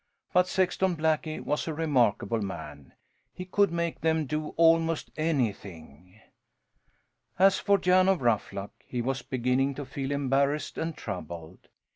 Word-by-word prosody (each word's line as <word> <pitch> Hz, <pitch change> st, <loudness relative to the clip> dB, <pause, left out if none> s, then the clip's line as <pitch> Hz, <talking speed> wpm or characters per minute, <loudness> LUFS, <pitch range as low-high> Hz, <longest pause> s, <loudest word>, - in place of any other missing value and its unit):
But 180 Hz, 0 st, +4 dB
Sexton 185 Hz, 0 st, +1 dB
Blackie 155 Hz, 0 st, 0 dB
was 150 Hz, -, -2 dB
a 160 Hz, -, -3 dB
remarkable 120 Hz, -8 st, +1 dB
man. 75 Hz, -8 st, -7 dB, 0.4 s
He 180 Hz, -, -6 dB
could 200 Hz, 0 st, +2 dB
make 170 Hz, -1 st, -2 dB
them 160 Hz, 0 st, +1 dB
do 150 Hz, +2 st, -3 dB
almost 165 Hz, -1 st, +3 dB
anything. 100 Hz, -, -3 dB, 1.2 s
As 195 Hz, +1 st, +5 dB
for 200 Hz, 0 st, +3 dB
Jan 185 Hz, 0 st, +4 dB
of 185 Hz, -8 st, +1 dB
Ruffluck, 105 Hz, -3 st, -1 dB
he 125 Hz, -, -5 dB
was 130 Hz, +2 st, -1 dB
beginning 130 Hz, +2 st, 0 dB
to 145 Hz, -, -6 dB
feel 135 Hz, +1 st, -4 dB
embarrassed 140 Hz, +1 st, 0 dB
and 160 Hz, -1 st, -3 dB
troubled. 85 Hz, -3 st, -7 dB
145 Hz, 135 wpm, -28 LUFS, 115-165 Hz, 1.2 s, As